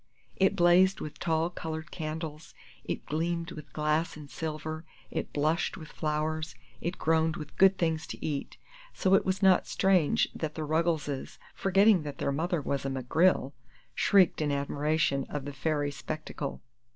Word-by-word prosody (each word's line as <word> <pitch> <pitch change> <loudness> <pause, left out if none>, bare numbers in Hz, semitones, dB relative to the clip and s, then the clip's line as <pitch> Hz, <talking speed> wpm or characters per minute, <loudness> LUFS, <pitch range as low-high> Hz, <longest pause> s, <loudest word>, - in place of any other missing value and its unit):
It 190 0 +3
blazed 175 +2 +5
with 150 0 -7
tall 165 0 0
colored 160 -1 -6
candles, 155 -1 -6 0.3
it - - -4
gleamed 170 +2 -2
with 155 -1 -10
glass 150 +1 0
and 145 -2 -11
silver, 155 0 -4 0.3
it - - -3
blushed 155 +4 0
with 160 -3 -10
flowers, 155 -1 -2 0.3
it 175 +2 -3
groaned 160 0 +2
with 150 -3 -8
good 195 0 +5
things 160 -2 0
to - - -6
eat; 145 -3 -3 0.4
so 190 - +2
it 195 - +5
was 190 +1 -1
not 190 -1 +5
strange 185 -6 +3
that 155 -2 -4
the 160 - -3
Ruggleses, 155 -3 -1 0.2
forgetting 195 0 +4
that 145 -2 -6
their - - -1
mother 165 +3 0
was 140 -1 -1
a 135 - -2
McGrill, 135 +3 +2 0.4
shrieked 190 -5 +4
in 150 -1 +1
admiration 140 0 0
of 145 -2 -4
the 145 - -5
fairy 145 +1 -1
spectacle. 150 -1 -5
155 Hz, 160 wpm, -29 LUFS, 150-170 Hz, 0.4 s, blazed